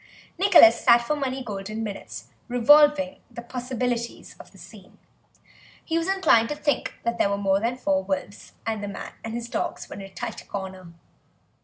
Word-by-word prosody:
Nicholas 345 Hz, -, +7 dB
sat 235 Hz, -, +7 dB
for 300 Hz, +5 st, -1 dB
many 265 Hz, -2 st, -3 dB
golden 215 Hz, 0 st, -5 dB
minutes 205 Hz, -2 st, -7 dB, 0.2 s
revolving 285 Hz, +3 st, +4 dB
the 235 Hz, -, -9 dB
possibilities 245 Hz, -1 st, -4 dB
of -, -, -14 dB
the -, -, -18 dB
scene; -, -, -15 dB, 0.9 s
he 325 Hz, -, -2 dB
was 330 Hz, -, -3 dB
inclined 380 Hz, -13 st, +3 dB
to 295 Hz, -, -2 dB
think 295 Hz, -1 st, -1 dB
that 235 Hz, 0 st, -2 dB
there -, -, +3 dB
were 200 Hz, -, -1 dB
more 195 Hz, -1 st, +1 dB
than 235 Hz, +4 st, -2 dB
four 195 Hz, -6 st, 0 dB
wolves 190 Hz, +1 st, -5 dB
and 220 Hz, -2 st, -2 dB
that 205 Hz, -, -4 dB
the 200 Hz, -, -6 dB
man -, -, -7 dB
and 225 Hz, 0 st, -5 dB
his 235 Hz, 0 st, -5 dB
dogs -, -, -4 dB
were -, -, -9 dB
in -, -, -8 dB
a 195 Hz, -, -9 dB
tight 230 Hz, +3 st, -7 dB
corner. 190 Hz, -3 st, -7 dB
235 Hz, 185 wpm, -25 LUFS, 200-265 Hz, 0.9 s, Nicholas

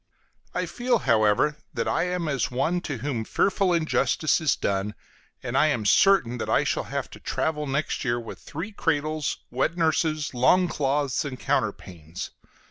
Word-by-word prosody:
I -, -, 0 dB
feel, 245 Hz, 0 st, 0 dB
however, 115 Hz, -, +2 dB, 0.2 s
that 115 Hz, -, -1 dB
I -, -, +1 dB
am 180 Hz, -2 st, -2 dB
as 140 Hz, -4 st, 0 dB
one 165 Hz, +8 st, 0 dB
to 145 Hz, -, -2 dB
whom 125 Hz, -6 st, -1 dB
fearful 195 Hz, -, +1 dB
injustice 160 Hz, -1 st, +2 dB
is 155 Hz, -4 st, +2 dB
done, 100 Hz, +1 st, -2 dB, 0.5 s
and 125 Hz, 0 st, -4 dB
I 155 Hz, +3 st, +5 dB
am 120 Hz, -8 st, 0 dB
certain 125 Hz, -, +4 dB
that -, -, -3 dB
I -, -, +3 dB
shall -, -, -1 dB
have -, -, -3 dB
to -, -, -11 dB
travel 150 Hz, -2 st, -2 dB
next 140 Hz, +2 st, -1 dB
year 120 Hz, -2 st, 0 dB
with 115 Hz, -, -8 dB
three 165 Hz, +8 st, -6 dB
cradles, 155 Hz, -5 st, -1 dB
wet 135 Hz, +7 st, 0 dB
nurses, 155 Hz, -2 st, +1 dB
long 155 Hz, +9 st, +4 dB
clothes, 140 Hz, -3 st, 0 dB
and 135 Hz, -4 st, -6 dB
counterpanes. 85 Hz, -1 st, -3 dB
145 Hz, 165 wpm, -25 LUFS, 120-165 Hz, 0.5 s, I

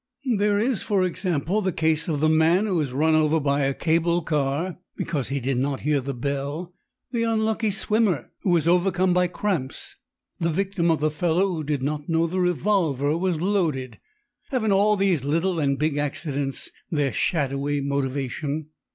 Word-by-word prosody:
There 205 Hz, 0 st, +2 dB
is, 230 Hz, +1 st, +1 dB
for 200 Hz, -3 st, +1 dB
example, 180 Hz, +1 st, -1 dB
the 190 Hz, -2 st, 0 dB
case 160 Hz, 0 st, 0 dB
of 150 Hz, -4 st, -1 dB
the 155 Hz, -, +4 dB
man 160 Hz, +5 st, +4 dB
who 185 Hz, -6 st, +1 dB
is 140 Hz, -4 st, -3 dB
run 155 Hz, +5 st, +2 dB
over 155 Hz, 0 st, +3 dB
by 140 Hz, -1 st, +1 dB
a 135 Hz, 0 st, +1 dB
cable 170 Hz, +1 st, +1 dB
car 150 Hz, +4 st, -1 dB, 0.2 s
because 140 Hz, -7 st, -2 dB
he 140 Hz, 0 st, -1 dB
did 130 Hz, 0 st, -1 dB
not 135 Hz, +1 st, -1 dB
hear 145 Hz, -1 st, +1 dB
the 135 Hz, +1 st, -4 dB
bell, 140 Hz, +7 st, -3 dB, 0.4 s
the 235 Hz, -3 st, -1 dB
unlucky 220 Hz, -1 st, +1 dB
swimmer 205 Hz, -3 st, 0 dB
who 175 Hz, -3 st, +3 dB
is 160 Hz, 0 st, -1 dB
overcome 180 Hz, +1 st, +3 dB
by 180 Hz, 0 st, +3 dB
cramps, 175 Hz, -7 st, -3 dB, 0.4 s
the 170 Hz, -, +1 dB
victim 185 Hz, 0 st, 0 dB
of 160 Hz, -2 st, +2 dB
the 155 Hz, 0 st, +2 dB
fellow 175 Hz, +5 st, +1 dB
who 160 Hz, -2 st, -3 dB
did 145 Hz, -2 st, -2 dB
not 150 Hz, +2 st, -3 dB
know 165 Hz, 0 st, +2 dB
the 180 Hz, +3 st, -2 dB
revolver 175 Hz, -6 st, +1 dB
was 175 Hz, -2 st, -1 dB
loaded. 165 Hz, -10 st, -1 dB, 0.5 s
Haven't 240 Hz, -7 st, 0 dB
all 205 Hz, +2 st, +4 dB
these 190 Hz, -8 st, +1 dB
little 165 Hz, +5 st, 0 dB
and 140 Hz, -2 st, +1 dB
big 150 Hz, 0 st, 0 dB
accidents 145 Hz, -1 st, -3 dB, 0.2 s
their 145 Hz, -4 st, 0 dB
shadowy 145 Hz, -2 st, 0 dB
motivation?" 140 Hz, +2 st, -2 dB
160 Hz, 175 wpm, -24 LUFS, 145-185 Hz, 0.5 s, the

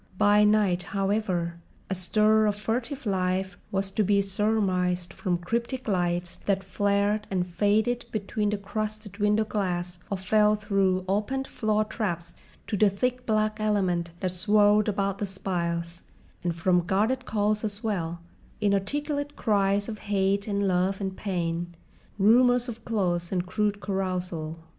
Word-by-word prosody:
By 205 Hz, +1 st, +5 dB
night, 210 Hz, -4 st, +3 dB, 0.2 s
however, 195 Hz, -4 st, 0 dB, 0.3 s
a -, -, -2 dB
stir 215 Hz, +4 st, +3 dB
of 205 Hz, -, +1 dB
furtive 235 Hz, +6 st, -3 dB
life 190 Hz, -1 st, -1 dB
was 195 Hz, 0 st, 0 dB
to 215 Hz, -, +1 dB
be 200 Hz, 0 st, +3 dB
surmised 190 Hz, -3 st, 0 dB
from 180 Hz, -4 st, -1 dB
cryptic 235 Hz, +8 st, -3 dB
lights 175 Hz, -3 st, 0 dB
that 195 Hz, -1 st, +1 dB
flared 200 Hz, +2 st, 0 dB
and 185 Hz, -2 st, 0 dB
faded 210 Hz, +7 st, +1 dB
behind 210 Hz, 0 st, -1 dB
the 210 Hz, -, 0 dB
crusted 215 Hz, 0 st, -5 dB
window 210 Hz, +1 st, +3 dB
glass 180 Hz, -4 st, -2 dB
or 200 Hz, -, -1 dB
fell 210 Hz, +3 st, +3 dB
through 195 Hz, -3 st, +1 dB
opened 210 Hz, +8 st, 0 dB
floor 215 Hz, -1 st, 0 dB
traps 170 Hz, -6 st, -3 dB, 0.3 s
to 215 Hz, -, -2 dB
the 210 Hz, +1 st, +5 dB
thick 250 Hz, +5 st, -2 dB
black 215 Hz, 0 st, +1 dB
element 190 Hz, -5 st, +1 dB
that 185 Hz, -2 st, 0 dB
swirled 210 Hz, +3 st, +4 dB
about 200 Hz, -1 st, -1 dB
the 205 Hz, -, -1 dB
spiles, 170 Hz, -3 st, -3 dB, 0.4 s
and 175 Hz, -2 st, -1 dB
from 175 Hz, 0 st, +2 dB
guarded 225 Hz, +7 st, +1 dB
calls 210 Hz, 0 st, 0 dB
as 210 Hz, -1 st, -3 dB
well, 170 Hz, -6 st, -2 dB, 0.4 s
inarticulate 285 Hz, +9 st, -1 dB
cries 200 Hz, -2 st, +1 dB
of 215 Hz, -2 st, -6 dB
hate 200 Hz, 0 st, 0 dB
and 200 Hz, -1 st, 0 dB
love 185 Hz, +1 st, +1 dB
and 190 Hz, -2 st, -3 dB
pain, 175 Hz, -3 st, -3 dB, 0.4 s
rumours 245 Hz, +4 st, +5 dB
of 230 Hz, -1 st, -7 dB
close 175 Hz, -6 st, -1 dB
and 180 Hz, -2 st, 0 dB
crude 205 Hz, +2 st, -1 dB
carousal. 180 Hz, -5 st, -3 dB
200 Hz, 145 wpm, -27 LUFS, 185-215 Hz, 0.4 s, By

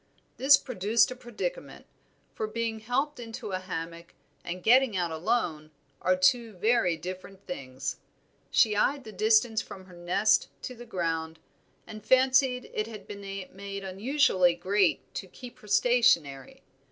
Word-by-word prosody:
This 275 Hz, +2 st, +7 dB
produced 225 Hz, -1 st, +1 dB
a -, -, -5 dB
predicament, 250 Hz, -, -6 dB, 0.5 s
for 220 Hz, -, -3 dB
being 225 Hz, 0 st, -3 dB
helped 260 Hz, +6 st, -2 dB
into 225 Hz, -2 st, -7 dB
a 185 Hz, -, -2 dB
hammock 170 Hz, -2 st, -7 dB, 0.3 s
and 180 Hz, +1 st, -6 dB
getting 245 Hz, -3 st, +4 dB
out 175 Hz, -2 st, -1 dB
alone 160 Hz, -2 st, -1 dB, 0.3 s
are 185 Hz, -, +3 dB
two 220 Hz, +5 st, +2 dB
very 195 Hz, -3 st, +1 dB
different 185 Hz, +3 st, -9 dB
things. 130 Hz, -6 st, -5 dB, 0.5 s
She 215 Hz, -3 st, +3 dB
eyed 275 Hz, +6 st, +1 dB
the 220 Hz, -, -10 dB
distance 220 Hz, +2 st, +3 dB
from 190 Hz, -1 st, -11 dB
her 180 Hz, -1 st, -15 dB
nest 190 Hz, +5 st, +2 dB
to 255 Hz, -, -5 dB
the 240 Hz, 0 st, -12 dB
ground, 165 Hz, -4 st, -3 dB, 0.5 s
and 215 Hz, -1 st, -10 dB
fancied 260 Hz, -1 st, +3 dB
it 215 Hz, +1 st, -2 dB
had 215 Hz, -3 st, -10 dB
been 200 Hz, -1 st, -8 dB
made 195 Hz, 0 st, -7 dB
unusually 190 Hz, -, +2 dB
great 190 Hz, +1 st, 0 dB
to 190 Hz, -, -6 dB
keep 245 Hz, +6 st, -12 dB
her 210 Hz, -, -16 dB
stationary. 235 Hz, -, +2 dB
210 Hz, 145 wpm, -28 LUFS, 185-240 Hz, 0.5 s, This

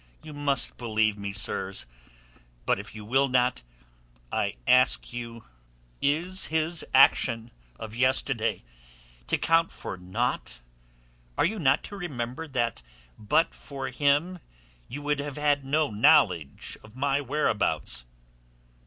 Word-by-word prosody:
You 155 Hz, -, -9 dB
must 140 Hz, -3 st, +2 dB
believe 110 Hz, -3 st, +1 dB
me, 100 Hz, -1 st, -5 dB
sirs. 95 Hz, -, -3 dB, 0.8 s
But -, -, +2 dB
if 100 Hz, +2 st, -9 dB
you 105 Hz, -1 st, -8 dB
will 135 Hz, +5 st, +3 dB
not, 125 Hz, -, +1 dB, 0.7 s
I -, -, -1 dB
ask 125 Hz, -1 st, +3 dB
you 115 Hz, -1 st, -7 dB, 0.6 s
is 170 Hz, +7 st, +1 dB
his 160 Hz, +1 st, 0 dB
action 120 Hz, -3 st, +4 dB, 0.3 s
of 110 Hz, -1 st, -8 dB
yesterday 130 Hz, -1 st, 0 dB, 0.6 s
to -, -, +1 dB
count 165 Hz, 0 st, +3 dB
for 95 Hz, -, -6 dB
naught? 90 Hz, -8 st, -3 dB, 0.8 s
Are -, -, +3 dB
you 210 Hz, +5 st, -1 dB
not 140 Hz, -2 st, +3 dB
to 205 Hz, -, -8 dB
remember 140 Hz, -4 st, -4 dB
that 120 Hz, -, -1 dB, 0.4 s
but 110 Hz, +10 st, +2 dB
for 135 Hz, -2 st, -6 dB
him 145 Hz, +7 st, +1 dB, 0.5 s
you 145 Hz, +3 st, -7 dB
would 145 Hz, 0 st, 0 dB
have 145 Hz, -1 st, -5 dB
had 145 Hz, -1 st, +2 dB
no 145 Hz, +1 st, +1 dB
knowledge 105 Hz, -, +3 dB
of 110 Hz, +1 st, -16 dB
my 140 Hz, +1 st, +1 dB
whereabouts?" 110 Hz, -, -1 dB
130 Hz, 125 wpm, -27 LUFS, 110-150 Hz, 0.8 s, action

